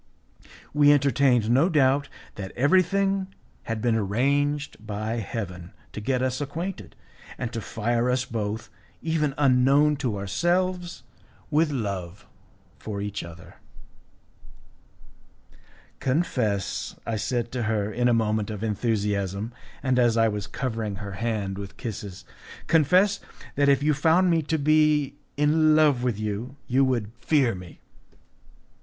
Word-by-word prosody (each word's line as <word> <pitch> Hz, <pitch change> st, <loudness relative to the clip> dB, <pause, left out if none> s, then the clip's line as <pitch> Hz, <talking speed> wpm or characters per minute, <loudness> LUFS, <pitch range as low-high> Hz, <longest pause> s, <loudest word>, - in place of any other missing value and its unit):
We 145 Hz, 0 st, +6 dB
entertained 135 Hz, -5 st, +3 dB
no 140 Hz, +9 st, +4 dB
doubt 140 Hz, -3 st, +2 dB, 0.2 s
that 95 Hz, -2 st, -7 dB
everything 190 Hz, +6 st, +2 dB, 0.4 s
had 115 Hz, -1 st, -3 dB
been 120 Hz, -2 st, +2 dB
arranged 140 Hz, +7 st, 0 dB
by 110 Hz, +2 st, -3 dB
Heaven 95 Hz, -5 st, -5 dB, 0.2 s
to 105 Hz, -, -6 dB
get 125 Hz, +3 st, 0 dB
us 130 Hz, +1 st, -1 dB
acquainted, 165 Hz, +7 st, -5 dB, 0.4 s
and 120 Hz, -2 st, -4 dB
to 115 Hz, -, -3 dB
fire 115 Hz, +3 st, -1 dB
us 125 Hz, 0 st, +1 dB
both, 110 Hz, -1 st, -4 dB, 0.3 s
even 155 Hz, -4 st, 0 dB
unknown 140 Hz, +2 st, +4 dB
to 125 Hz, -7 st, -2 dB
ourselves, 175 Hz, -, -1 dB, 0.5 s
with 155 Hz, +1 st, +3 dB
love 100 Hz, -, -4 dB, 0.5 s
for 105 Hz, -2 st, -5 dB
each 105 Hz, 0 st, -4 dB
other. 85 Hz, 0 st, -12 dB, 2.4 s
"Confess," 125 Hz, -, -1 dB
I 115 Hz, -, -2 dB
said 120 Hz, +2 st, -2 dB
to 125 Hz, -, -3 dB
her, 105 Hz, -1 st, 0 dB
in 120 Hz, +1 st, +1 dB
a -, -, +4 dB
moment 110 Hz, -2 st, +1 dB
of 105 Hz, -1 st, -5 dB
enthusiasm, 105 Hz, -1 st, -1 dB, 0.3 s
and 130 Hz, -2 st, +2 dB
as 120 Hz, -2 st, +3 dB
I 115 Hz, 0 st, +4 dB
was 105 Hz, -2 st, -3 dB
covering 115 Hz, -5 st, -3 dB
her 100 Hz, 0 st, -7 dB
hand 100 Hz, -1 st, -3 dB
with 100 Hz, -1 st, -8 dB
kisses, 100 Hz, -4 st, -7 dB, 0.4 s
"confess 180 Hz, +6 st, +4 dB, 0.3 s
that 140 Hz, 0 st, +3 dB
if 140 Hz, 0 st, +3 dB
you 150 Hz, 0 st, +3 dB
found 165 Hz, +5 st, +3 dB
me 165 Hz, -1 st, +3 dB
to 160 Hz, +1 st, -1 dB
be 150 Hz, -1 st, +2 dB, 0.2 s
in 155 Hz, +1 st, +4 dB
love 150 Hz, -5 st, +4 dB
with 120 Hz, -4 st, -1 dB
you 110 Hz, +5 st, -4 dB
you 130 Hz, +2 st, +2 dB
would 120 Hz, -5 st, 0 dB
fear 135 Hz, -7 st, +2 dB
me." 90 Hz, -3 st, -11 dB
125 Hz, 135 wpm, -25 LUFS, 105-145 Hz, 2.4 s, We